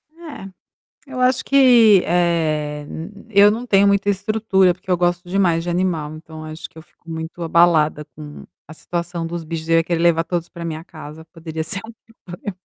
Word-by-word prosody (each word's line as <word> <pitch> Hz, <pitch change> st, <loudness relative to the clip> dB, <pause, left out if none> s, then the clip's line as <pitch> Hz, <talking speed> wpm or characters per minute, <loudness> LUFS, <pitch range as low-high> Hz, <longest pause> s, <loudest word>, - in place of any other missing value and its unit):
É, 315 Hz, -, -10 dB, 0.6 s
eu 260 Hz, -2 st, -6 dB
acho 250 Hz, 0 st, +2 dB
que, 240 Hz, -8 st, +6 dB
eh, 155 Hz, -4 st, 0 dB, 0.4 s
eu 200 Hz, 0 st, +6 dB
não 235 Hz, +4 st, -4 dB
tenho 200 Hz, -2 st, +4 dB
muita 200 Hz, 0 st, +2 dB
estrutura, 195 Hz, -2 st, +1 dB
porque 185 Hz, +1 st, -12 dB
eu 180 Hz, -, +3 dB
gosto 175 Hz, 0 st, -1 dB
demais 175 Hz, -3 st, +1 dB
de 175 Hz, -, -4 dB
animal 170 Hz, -4 st, -1 dB
então 155 Hz, 0 st, -10 dB
eu 155 Hz, -, -7 dB
acho 155 Hz, -, -8 dB
que -, -, -36 dB
eu -, -, -10 dB
fico 170 Hz, -, -28 dB
muito 160 Hz, +2 st, -6 dB
abalada 160 Hz, -2 st, +3 dB
com 150 Hz, -1 st, -11 dB, 0.2 s
a 155 Hz, -, -12 dB
situação 170 Hz, 0 st, -4 dB
dos 170 Hz, -1 st, -5 dB
bichos, 160 Hz, 0 st, -6 dB
eu 165 Hz, -, +4 dB
ia 165 Hz, -, +1 dB
querer 170 Hz, -1 st, -1 dB
levar 165 Hz, -1 st, +3 dB
todos 170 Hz, 0 st, -3 dB
para 170 Hz, -2 st, -10 dB
minha 160 Hz, 0 st, -5 dB
casa, 155 Hz, -2 st, -11 dB
poderia 160 Hz, -1 st, -6 dB
ser 185 Hz, +4 st, -2 dB
um 230 Hz, -, -11 dB, 0.3 s
problema. 180 Hz, +2 st, -7 dB
170 Hz, 195 wpm, -20 LUFS, 160-195 Hz, 0.6 s, que